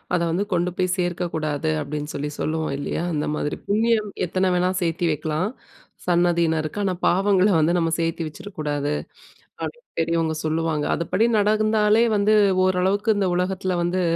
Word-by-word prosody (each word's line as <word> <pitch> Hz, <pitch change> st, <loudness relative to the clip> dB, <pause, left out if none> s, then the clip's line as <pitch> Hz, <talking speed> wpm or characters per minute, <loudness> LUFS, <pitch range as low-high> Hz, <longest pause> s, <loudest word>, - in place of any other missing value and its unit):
அத 170 Hz, -, +1 dB
வந்து 190 Hz, +5 st, 0 dB
கொண்டு 175 Hz, +1 st, +1 dB
போய் 185 Hz, 0 st, +1 dB
சேர்க்கக்கூடாது 160 Hz, -4 st, -2 dB
அப்படின்னு 150 Hz, +1 st, -4 dB
சொல்லி 145 Hz, +1 st, -3 dB
சொல்லுவோம் 155 Hz, -2 st, -1 dB
இல்லையா? 145 Hz, +3 st, -3 dB
அந்த 150 Hz, -1 st, -1 dB
மாதிரி 150 Hz, -, -2 dB
புண்ணியம் 215 Hz, 0 st, +2 dB, 0.2 s
எத்தனை 185 Hz, +2 st, +1 dB
வேணா 180 Hz, +1 st, +2 dB
சேர்த்து 170 Hz, 0 st, 0 dB
வெக்கலாம். 155 Hz, +5 st, -1 dB, 0.6 s
சந்ததியினர்க்கு. 170 Hz, -1 st, +1 dB
ஆனா 190 Hz, -2 st, +1 dB
பாவங்கள 195 Hz, +1 st, +3 dB
வந்து 160 Hz, +2 st, +3 dB
நம்ம 165 Hz, -1 st, +1 dB
சேர்த்து 165 Hz, 0 st, -1 dB
வச்சுர 155 Hz, +6 st, -9 dB
கூடாது. 145 Hz, -1 st, -1 dB, 0.7 s
அப்படின்னு 480 Hz, 0 st, -6 dB
பெரியவங்க 165 Hz, -1 st, +1 dB
சொல்லுவாங்க! 155 Hz, -1 st, 0 dB
அதுப்படி 185 Hz, +6 st, +1 dB
நடந்தாலே 215 Hz, +1 st, +3 dB
வந்து, 205 Hz, +1 st, +3 dB, 0.3 s
ஓரளவுக்கு 190 Hz, +4 st, +2 dB
இந்த 195 Hz, -2 st, +1 dB
உலகத்தில் 185 Hz, 0 st, -1 dB
வந்து, 180 Hz, +2 st, 0 dB
175 Hz, 145 wpm, -23 LUFS, 160-195 Hz, 0.7 s, பாவங்கள